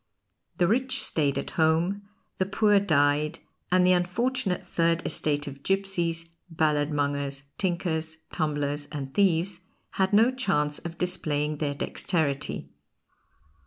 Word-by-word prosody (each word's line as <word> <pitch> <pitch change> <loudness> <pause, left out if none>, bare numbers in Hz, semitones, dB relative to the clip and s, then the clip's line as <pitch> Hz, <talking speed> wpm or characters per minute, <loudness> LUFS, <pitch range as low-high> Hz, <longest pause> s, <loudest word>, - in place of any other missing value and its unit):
The 175 - +3
rich 260 +6 +1
stayed 145 -3 +1
at - - -4
home, 165 +6 +2 0.4
the 185 - +1
poor 205 0 +4
died, 150 -4 +2 0.3
and 180 0 +5
the 185 - +5
unfortunate 190 +3 0
third 165 0 +1
estate 145 -1 +1
of 140 -2 -8
gipsies, 175 -3 0 0.2
balladmongers, 145 -3 0 0.2
tinkers, 165 -4 -1
tumblers, 145 -2 -1
and 135 -3 -5
thieves 185 -1 +2 0.4
had 190 - +3
no 225 +4 +5
chance 170 - 0
of 170 -1 -7
displaying 150 -4 0
their 145 -1 -2
dexterity. 145 -1 -2
165 Hz, 120 wpm, -27 LUFS, 145-190 Hz, 0.4 s, and